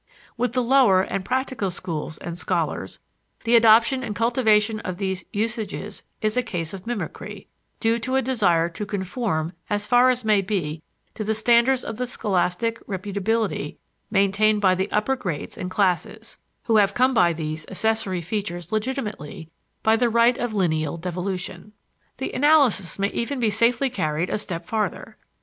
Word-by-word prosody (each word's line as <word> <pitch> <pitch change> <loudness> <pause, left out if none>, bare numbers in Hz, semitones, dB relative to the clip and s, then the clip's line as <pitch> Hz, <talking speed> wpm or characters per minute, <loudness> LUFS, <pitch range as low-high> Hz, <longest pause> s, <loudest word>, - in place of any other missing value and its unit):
With 245 -1 -1
the 250 -1 +1
lower 235 -7 +5
and 195 0 -3
practical 255 -2 -1
schools 160 -4 -5
and 170 - -6
scholars, 175 - -2 0.5
the 230 +1 +3
adoption 230 +3 +6
and 215 -4 -4
cultivation 220 -2 +2
of 185 -5 -5
these 190 -1 -3
usages 215 -1 -3 0.2
is 215 0 +1
a 250 - +3
case 170 -8 -4
of 190 +2 -9
mimicry 240 -3 -5 0.3
due 230 0 +1
to 255 +3 -2
a 265 - +3
desire 185 -10 +2
to 170 +5 -5
conform 190 -4 -2 0.2
as 205 0 -1
far 245 +3 +5
as 250 -2 0
may 210 -2 +4
be 170 -6 -3 0.3
to 215 - -4
the 220 +1 0
standards 235 +3 +3
of 225 - -6
scholastic 210 +1 -1
reputability 205 +3 -2 0.3
maintained 205 +1 +3
by 190 -2 +4
the 190 +2 -1
upper 215 +6 +1
grades 180 - -5
and 180 - -5
classes, 195 +3 -1 0.2
who 225 -2 +3
have 200 -1 +3
come 255 +2 +3
by 175 -8 +4
these 155 -1 -5
accessory 200 -2 0
features 175 -2 -4
legitimately, 210 - -4 0.3
by 220 0 +4
the 240 +1 +2
right 235 +2 +3
of 240 -1 -1
lineal 160 -5 0
devolution. 180 +2 -5 0.4
The 265 - -4
analysis 265 - +3
may 200 0 +1
even 255 +5 -3
be 225 -3 +2
safely 235 +5 +2
carried 155 -5 -1
a - - 0
step 170 -4 -5
farther. 220 +1 -3
210 Hz, 160 wpm, -23 LUFS, 185-235 Hz, 0.5 s, adoption